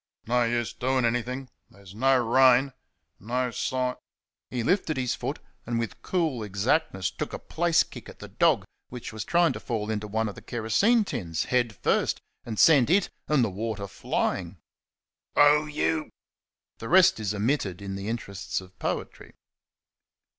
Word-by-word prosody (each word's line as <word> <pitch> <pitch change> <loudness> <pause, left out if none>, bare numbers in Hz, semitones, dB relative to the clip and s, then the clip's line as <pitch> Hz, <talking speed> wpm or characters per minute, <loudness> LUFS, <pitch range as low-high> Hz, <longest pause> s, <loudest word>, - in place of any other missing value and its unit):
no 120 +1 +2
use 120 0 -1
doing 130 0 0
anything...there's 120 -5 -5
no 130 +5 +3
rain...no 125 -1 +1
si 125 +2 -1 0.3
" - - -66
he 125 -2 -2
lifted 165 - +1
his 125 -2 0
foot - - -4 0.3
and 120 0 -1
with 115 -1 -4
cool 160 -10 -1
exactness 100 - 0
took - - -5
a - - -2
place 170 0 +2
kick - - -11
at - - -12
the - - -9
dog, - - +2 0.3
which 125 -2 -7
was 110 -2 -4
trying 170 +7 +3
to - - -6
fall 110 -3 -3
into 105 -1 -3
one 110 +2 -1
of 105 - -5
the 115 - -12
kerosene 120 - +2
tins, 90 - -3
head 120 -4 0
first, - - +1 0.3
and 110 -2 -4
sent 145 -3 +6
it 190 +3 +3 0.2
and 150 -4 +3
the 115 - +1
water 105 +1 -4
flying. 95 - -2 0.8
"Oh 150 +1 +5
you 155 +1 -1 0.3
!" - - -66
The 115 - -6
rest 190 -2 +6
is 105 -1 -2
omitted 105 -4 -1
in 100 -1 -5
the 100 +1 -5
interests 105 -4 -4
of 95 0 -15
Poetry. - - -4
120 Hz, 160 wpm, -27 LUFS, 110-140 Hz, 0.8 s, sent